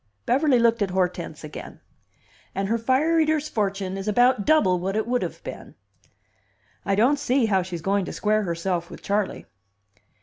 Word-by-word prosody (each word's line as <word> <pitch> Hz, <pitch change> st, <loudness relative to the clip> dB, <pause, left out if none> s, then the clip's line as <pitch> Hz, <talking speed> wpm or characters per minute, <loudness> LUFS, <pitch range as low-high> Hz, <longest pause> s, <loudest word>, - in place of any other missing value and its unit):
Beverly 270 Hz, +1 st, +3 dB
looked 230 Hz, -1 st, +3 dB
at 200 Hz, -, +1 dB
Hortense 180 Hz, -1 st, -2 dB
again. -, -, -9 dB, 0.8 s
"And 195 Hz, 0 st, -1 dB
her 230 Hz, +1 st, +1 dB
fire 275 Hz, +8 st, +2 dB
eater's 310 Hz, -1 st, +1 dB
fortune 195 Hz, -5 st, -2 dB
is 195 Hz, -, -6 dB
about 245 Hz, 0 st, +3 dB
double 195 Hz, -, +4 dB
what 190 Hz, +3 st, -2 dB
it 220 Hz, -, 0 dB
would 245 Hz, +1 st, 0 dB
have -, -, -5 dB
been. -, -, -9 dB, 1.1 s
I 200 Hz, -, 0 dB
don't 255 Hz, +8 st, +3 dB
see 265 Hz, -3 st, +2 dB
how 195 Hz, -4 st, +2 dB
she's 175 Hz, -3 st, -6 dB
going 200 Hz, 0 st, +1 dB
to -, -, -6 dB
square 215 Hz, 0 st, +1 dB
herself 170 Hz, -1 st, -2 dB
with -, -, -11 dB
Charley." 205 Hz, 0 st, -1 dB
210 Hz, 170 wpm, -24 LUFS, 190-250 Hz, 1.1 s, double